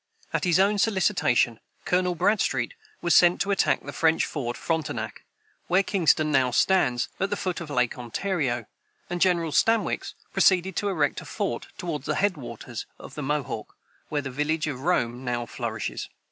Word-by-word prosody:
At - - 0
his 175 0 +3
own 200 +2 +3
solicitation, 190 - +2 0.3
Colonel 180 0 +1
Bradstreet 205 - +1 0.3
was 170 - +3
sent 175 0 +6
to 200 - 0
attack 195 - +2
the - - -7
French 160 0 +3
fort 120 -5 -4
Frontenac, 160 -1 -3 0.4
where 185 +3 +3
Kingston 160 -5 +2
now 135 -3 +3
stands, 125 -3 +2
at 195 - 0
the 205 - 0
foot 185 -3 -3
of 165 - -7
Lake 125 -3 0
Ontario; 125 - -1 0.5
and 175 -1 -2
General 170 -4 +3
Stanwix 225 +7 +1 0.2
proceeded 185 -1 +3
to 205 - 0
erect 155 -7 0
a - - -11
fort - - -3
toward 150 -5 -4
the - - 0
head 200 -2 +2
waters 120 -3 -7
of - - -11
the 150 - -5
Mohawk, 135 -6 -3 0.3
where 145 -2 -1
the 135 - -5
village 150 +4 0
of 140 -4 -4
Rome 125 -7 0
now 120 -1 -2
flourishes. - - -4
160 Hz, 170 wpm, -26 LUFS, 130-185 Hz, 0.5 s, sent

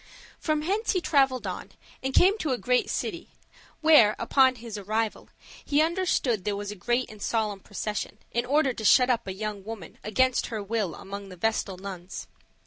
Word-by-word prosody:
From 305 -1 0
hence 410 +8 0
he 370 - +2
traveled 270 -6 +2
on, - - -6 0.3
and 265 - -2
came 370 +8 +5
to 300 -8 0
a - - -1
great 250 0 +1
city, - - -3 0.5
where, 300 -10 +6
upon 260 -2 +4
his 230 -2 -8
arrival, 215 +2 -2 0.3
he 290 0 +1
understood 315 - +1
there 205 +1 -1
was 205 0 -4
a - - -7
great 240 +6 0
and 215 -1 -13
solemn 215 -3 -1
procession, 210 +1 -4
in 235 - 0
order 275 +1 +2
to 225 - -7
shut 250 +4 +6
up 235 -3 -1
a - - -2
young 205 0 -5
woman 210 -5 -8
against 255 +4 +2
her 220 -3 -4
will 205 -5 -2
among 200 0 -8
the 185 - -11
vestal 200 -1 -1
nuns. 185 -1 -7
225 Hz, 185 wpm, -27 LUFS, 205-265 Hz, 0.5 s, where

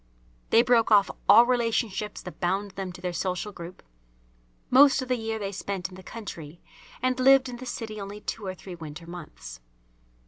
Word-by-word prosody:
They 230 - +6
broke 240 -2 +3
off 205 -2 +5 0.2
all 235 - +9
relationships 230 -4 -1
that 180 - -10
bound 195 +3 -1
them 190 -1 -5
to 180 0 -12
their 180 -1 -3
social 185 +4 -2
group. 175 -1 -10 0.9
Most 270 +1 +6
of 255 - -10
the 250 - +2
year 225 -1 -3
they 200 -2 -4
spent 190 -2 -4
in - - -15
the 190 - -11
country 175 -7 -9 0.4
and 255 0 +1
lived 265 0 +6
in 245 -1 -7
the 255 +1 -9
city 215 -3 -5
only 200 +1 -7
two 210 -1 -5
or 185 - -4
three 185 0 -10
winter 160 -1 -9
months. 165 - -10
205 Hz, 185 wpm, -26 LUFS, 180-235 Hz, 0.9 s, all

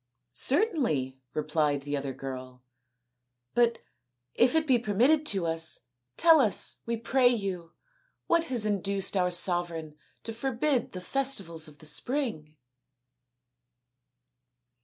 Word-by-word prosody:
" 120 - -42 0.2
Certainly," 230 - 0
replied 150 -2 0
the 145 0 -3
other 140 -1 -4
girl, 130 -1 -8 0.4
" 125 0 -55
but 235 -1 +2 0.6
if 245 +5 +2
it 320 0 +2
be 260 -5 +3
permitted 250 +9 +2
to 190 -4 0
us, 165 0 0 0.4
tell 330 -2 +6
us, 220 -7 +2
we 235 0 -1
pray 250 +3 +2
you, 190 -8 -2 0.5
what 335 0 +1
has 245 -6 0
induced 200 -1 0
our 180 -1 +2
sovereign 175 -3 +2 0.3
to 225 - -5
forbid 255 +2 -1
the 185 - -6
festivals 185 - 0
of 150 -1 -15
the 155 - -14
spring 155 - -2
190 Hz, 125 wpm, -28 LUFS, 150-245 Hz, 0.6 s, tell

